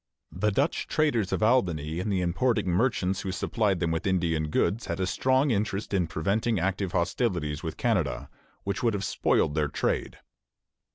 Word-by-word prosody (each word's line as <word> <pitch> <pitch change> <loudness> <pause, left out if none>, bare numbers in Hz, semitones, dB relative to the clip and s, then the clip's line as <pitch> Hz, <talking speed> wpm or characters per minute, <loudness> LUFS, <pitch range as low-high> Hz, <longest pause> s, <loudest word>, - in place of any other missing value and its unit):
The 105 - 0
Dutch 140 +10 0
traders 120 -11 +1
of - - 0
Albany 85 - +1
and 100 +3 -2
the 95 -2 +1
importing 100 +5 +1
merchants 95 -2 +1
who 95 - -3
supplied 100 0 0
them 85 -1 0
with 80 +4 -2
Indian 85 -4 +1
goods 110 +8 0
had - - -3
a 95 - +1
strong 130 +8 +2
interest 105 -1 -1
in 90 -4 +1
preventing 100 +7 0
active 95 +1 -1
hostilities 85 - -1
with 80 -3 -5
Canada, 95 - 0 0.4
which 100 -1 -2
would 115 -3 +1
have 100 -1 -2
spoiled 75 - +1
their 75 -1 +1
trade. - - -2
95 Hz, 170 wpm, -27 LUFS, 85-110 Hz, 0.4 s, strong